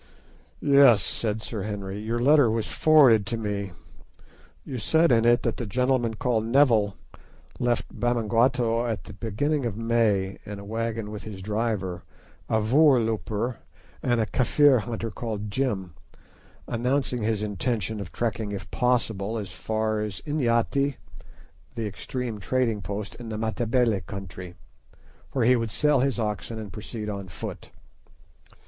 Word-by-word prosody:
"Yes," 140 -6 +6
said 110 -1 -2
Sir 110 -4 -4
Henry, 100 -1 -4
"your 110 +2 -2
letter 140 +1 +5
was 110 0 0
forwarded 140 -9 +5
to 115 - -2
me. 100 -4 -3 0.9
You 130 - -5
said 160 +8 +3
in 115 -1 +4
it 120 +1 +4
that 115 -3 -1
the 120 - -4
gentleman 125 +1 +1
called 115 -1 0
Neville 115 -5 +3 0.6
left 120 -1 -1
Bamangwato 120 0 +2
at 110 -7 -3
the - - -10
beginning 125 +8 -1
of 115 -4 -3
May 110 -4 +1
in 105 0 -7
a 100 - -9
wagon 115 0 -3
with 105 +1 -7
a 100 -3 -7
driver, 105 -2 -2 0.5
a 110 - +2
voorlooper, 115 - +2 0.4
and 120 -2 +1
a 110 - +2
Kafir 135 +3 +4
hunter 115 0 -4
called 105 -3 -5
Jim, 100 -8 -1 0.7
announcing 125 +1 0
his 110 -1 0
intention 105 0 -2
of 100 -3 -7
trekking 110 -3 -2
if 100 -1 -6
possible 115 -4 0
as 100 -4 -5
far 110 +3 -1
as 105 -2 -4
Inyati, 140 -1 +1 0.8
the 115 -2 -3
extreme 115 +2 -4
trading 115 0 0
post 100 +3 -5
in 120 -1 -8
the 110 - -4
Matabele 115 0 +1
country, 90 -1 -8 0.8
where 130 -4 +1
he 125 +2 +6
would 115 -2 -1
sell 150 +5 +2
his 135 0 +1
wagon 105 0 -3
and 105 -3 -7
proceed 105 0 -6
on 100 -2 -5
foot. 80 -5 -7
115 Hz, 145 wpm, -26 LUFS, 105-125 Hz, 0.9 s, Yes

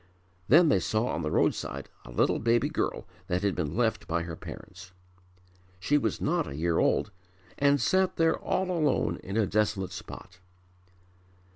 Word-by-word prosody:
Then 160 +4 +6
they 100 - +4
saw 110 +7 0
on - - -2
the 75 - -2
road - - +3
side - - -6 0.2
a - - -11
little - - +1
baby 115 +1 +2
girl - - -2 0.2
that 90 +2 -1
had 100 -2 +1
been 80 -3 -3
left 110 -3 0
by 85 +1 -1
her 85 -1 -6
parents. 90 +2 -11 0.9
She 140 +11 +1
was 115 -8 0
not - - 0
a 70 - -6
year 85 +2 0
old 105 - +1 0.5
and 140 0 +4
sat 185 +8 +2
there 165 0 +2
all 185 0 -1
alone 155 -6 +1
in 100 +3 -5
a 110 - +3
desolate 100 -2 0
spot. 90 -1 -10
105 Hz, 170 wpm, -28 LUFS, 90-140 Hz, 0.9 s, Then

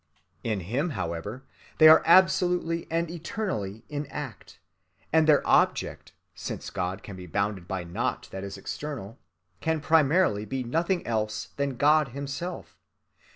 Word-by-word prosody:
In 110 -4 -1
Him, 125 - -1
however, 85 +10 -4 0.3
they 155 - +8
are 155 - +9
absolutely 180 -2 +4
and 165 +1 0
eternally 160 - -4
in 145 -1 -4
act, - - -8 0.6
and 160 -1 +5
their 150 -2 +4
object, - - +1 0.2
since - - -6
God 90 +1 -3
can 100 - -8
be 90 -1 -9
bounded 100 0 -2
by 95 -2 -3
naught 85 0 -3
that 95 0 -6
is 100 0 -6
external, 115 -1 -6 0.4
can 160 0 0
primarily 155 - +3
be 130 +5 -3
nothing 170 +9 0
else 110 -2 -2
than 140 -3 -1
God 150 +1 +4
himself. 140 +6 -5
140 Hz, 140 wpm, -27 LUFS, 100-160 Hz, 0.6 s, are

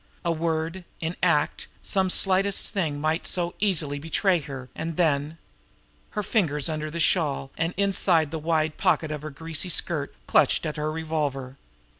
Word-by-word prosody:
A 170 - +2
word, 165 +2 -1 0.2
in 165 +2 -2
act, - - +1 0.2
some 190 -2 +1
slightest 195 +1 +3
thing, 160 -7 -1
might 155 +2 0
so 175 -1 0
easily 155 -8 0
betray 175 +4 +2
her; 135 -3 -7
and 165 -1 -4
then 155 -2 +1 0.8
Her 210 - +1
fingers 160 - +1
under 155 -1 -3
the 170 +2 -5
shawl 145 -5 +1
and 165 +2 -1
inside 185 -6 +3
the 160 - -3
wide 155 -1 0
pocket 160 -2 +2
of 150 -1 -4
her 155 - -5
greasy 160 +4 -3
skirt, 155 -3 0
clutched - - +3
at 155 - -2
her 150 0 -1
revolver. 150 -5 -2
160 Hz, 160 wpm, -26 LUFS, 150-175 Hz, 0.8 s, slightest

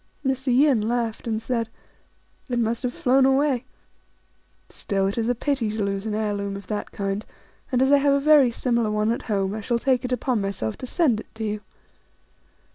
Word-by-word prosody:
Mr. 265 0 -1
Yin 260 -1 +4
laughed, 230 0 -2
and 220 -1 -2
said, 230 -2 -1 0.4
" - - -39
It 245 - -1
must 230 0 0
have 250 -1 -1
flown 260 +2 +3
away! 265 -1 +2 1.0
Still, 195 -2 -2
it 195 - -1
is 230 0 0
a 245 - +2
pity 260 -3 -1
to 215 0 -2
lose 195 +1 -2
an 210 - -2
heir 215 -1 0
loom 200 -1 -3
of 200 - -10
that 210 -1 -4
kind; 200 +1 -3 0.5
and 255 0 +3
as 265 - +3
I 285 - +6
have 280 0 +3
a - - +2
very 290 -3 +6
similar 235 -1 0
one 210 +1 +1
at 235 - -2
home, 195 -2 0
I 215 - -4
shall 235 +3 0
take 255 0 +1
upon 250 -2 0
myself 195 - -3
to 255 - -7
send 260 -8 +2
it - - -9
to 225 - -5
you." 210 -1 -2
230 Hz, 205 wpm, -24 LUFS, 210-260 Hz, 1.0 s, I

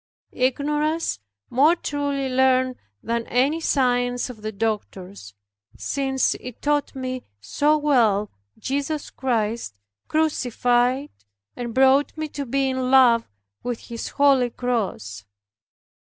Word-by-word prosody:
Ignorance 295 - 0 0.3
more 295 +7 +5
truly 285 -4 -2
learned 255 0 +2 0.3
than 235 0 -2
any 275 +7 +1
science 245 -3 +1
of 220 -3 -14
the 215 0 -4
doctors, 195 - -4 0.4
since 270 -2 0
it 250 -2 -9
taught 290 -1 0
me 255 -1 -4 0.2
so 295 - +1
well 230 -9 +2 0.3
Jesus 285 +2 -3
Christ 230 - -2 0.3
crucified 255 -3 +1 0.4
and 240 -2 -5
brought 265 +3 +4
me 310 0 -2
to 280 -2 -5
be 270 +2 +1
in 260 -1 -1
love 250 -3 +5 0.3
with 245 -2 -3
His 230 -1 -5
holy 275 -3 +3
cross. 205 - -3
255 Hz, 110 wpm, -23 LUFS, 235-280 Hz, 0.4 s, more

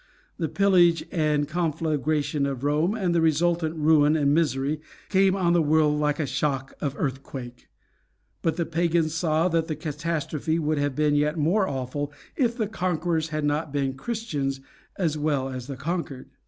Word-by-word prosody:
The 160 -3 -1
pillage 180 -4 +4
and 150 -3 +1
conflagration 155 -3 0
of 135 -2 -4
Rome, 155 +8 +1
and 185 -6 0
the 170 - +3
resultant 165 +1 +1
ruin 155 -1 +4
and 145 -2 +2
misery, 145 -1 0 0.3
came 190 -1 +4
on 175 -3 +2
the 175 - +4
world 150 -1 +3
like 150 -1 +1
a 155 - +1
shock 135 -2 -2
of 140 -1 -2
earthquake; 130 -3 -5 0.7
but 165 - 0
the 170 - 0
Pagans 165 -1 +1
saw 160 0 +1
that 165 -1 0
the 155 - -2
catastrophe 155 +1 -2
would 155 -2 0
have 145 -2 -1
been 150 -1 +2
yet 150 +2 +1
more 185 +6 +2
awful 140 +1 -3 0.2
if 240 -4 +1
the 220 - +1
conquerors 170 -4 -1
had 155 -1 -2
not 150 +1 -1
been 135 -2 -1
Christians 145 - -3 0.4
as 160 -5 0
well 145 -3 0
as 130 -1 -6
the 135 -2 -6
conquered. 155 -2 -4
155 Hz, 165 wpm, -25 LUFS, 145-170 Hz, 0.7 s, pillage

